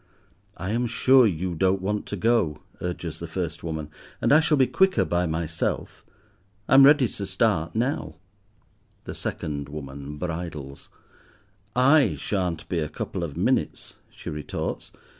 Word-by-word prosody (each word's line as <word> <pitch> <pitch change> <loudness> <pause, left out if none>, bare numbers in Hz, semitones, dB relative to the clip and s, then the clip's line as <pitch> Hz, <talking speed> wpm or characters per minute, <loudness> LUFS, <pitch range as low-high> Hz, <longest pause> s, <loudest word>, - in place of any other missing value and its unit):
"I 90 +4 -3
am 120 +2 0
sure 125 +1 +5
you 90 -1 -2
don't 95 +3 +2
want 105 +3 -2
to - - -3
go," 105 -7 +1 0.2
urges 85 -2 -4
the 85 - -6
first 85 -1 -4
woman, 80 -2 -4 0.3
"and - - +3
I 155 - +8
shall 160 -2 +2
be 130 - +5
quicker 190 +7 +3
by 90 0 0
myself. 80 0 -3 0.6
I - - +2
am 135 +1 +9
ready 145 -3 +6
to 100 - -6
start 95 -4 0
now." 115 - -1 0.9
The - - -6
second 70 -2 -4
woman 70 0 -7
bridles. 80 -4 -6 0.9
"I 135 +1 +5
shan't 90 -5 -2
be 85 - -1
a 75 -2 -2
couple 75 - -4
of - - -5
minutes," - - -1
she - - -8
retorts. 75 -1 -4
90 Hz, 150 wpm, -25 LUFS, 80-115 Hz, 0.9 s, am